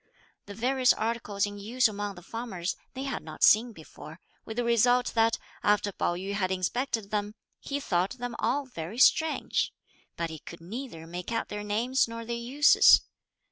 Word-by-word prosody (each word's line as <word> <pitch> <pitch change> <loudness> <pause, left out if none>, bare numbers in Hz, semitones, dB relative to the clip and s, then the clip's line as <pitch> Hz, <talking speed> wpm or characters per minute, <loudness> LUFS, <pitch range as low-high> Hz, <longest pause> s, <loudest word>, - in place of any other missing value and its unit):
The 200 - -8
various 255 +3 +3
articles 220 -3 -1
in 205 0 -7
use 235 +5 +2
among 205 -1 -4
the 175 - -12
farmers 195 -6 -4 0.2
they 265 - -4
had 275 -2 -3
not - - -6
seen 230 +3 +6
before, 160 -3 -12 0.3
with 220 - -7
the 245 - +1
result 245 +2 +3
that 225 0 +3 0.2
after 205 0 +2
Pao 175 - -1
yü 190 +3 -4
had 195 -2 0
inspected 210 +3 -2
them, 210 0 -2 0.2
he 285 0 -4
thought 190 -1 -1
them 245 -1 -5
all 285 +1 0
very 185 -4 -7
strange; 315 +4 +3 0.5
but 165 -1 -2
he 160 - -8
could 170 - -11
neither 190 -1 -7
make 175 +4 -6
out 230 - -2
their 210 0 -5
names 235 +6 +1
nor 230 0 -7
their 235 +1 -3
uses. 255 +5 +6
220 Hz, 180 wpm, -28 LUFS, 195-245 Hz, 0.5 s, seen